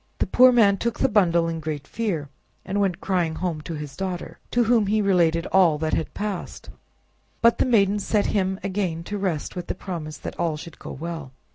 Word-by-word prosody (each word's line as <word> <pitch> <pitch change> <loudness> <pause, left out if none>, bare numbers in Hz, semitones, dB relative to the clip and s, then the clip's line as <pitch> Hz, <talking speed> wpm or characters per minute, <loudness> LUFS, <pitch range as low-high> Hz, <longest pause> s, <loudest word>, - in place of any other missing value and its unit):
The - - +1
poor 255 +1 +6
man 210 -5 +5
took 235 +3 -2
the - - +4
bundle 170 -5 +3
in 165 -1 -3
great 155 -3 -4
fear, 180 -7 -2 0.4
and 200 +2 -1
went 190 -4 0
crying 175 -4 0
home 170 -3 -3
to 160 +2 -6
his 150 -2 -7
daughter, 185 -2 -5
to 245 - +2
whom 225 -2 +3
he 215 +2 +2
related 170 -4 +2
all 180 -5 +5
that 155 +1 -2
had 160 - -2
passed. 205 -3 -5 0.7
But 235 0 +5
the - - +3
maiden 205 -4 +3
sent 205 +1 +1
him 190 -2 0
again 185 -4 -2
to 205 +3 -4
rest 180 -6 -2
with 180 - -5
the - - -3
promise 165 -5 -6
that - - -8
all 165 -3 0
should 165 +1 -10
go - - -8
well. 160 -3 -6
185 Hz, 210 wpm, -24 LUFS, 160-205 Hz, 0.7 s, poor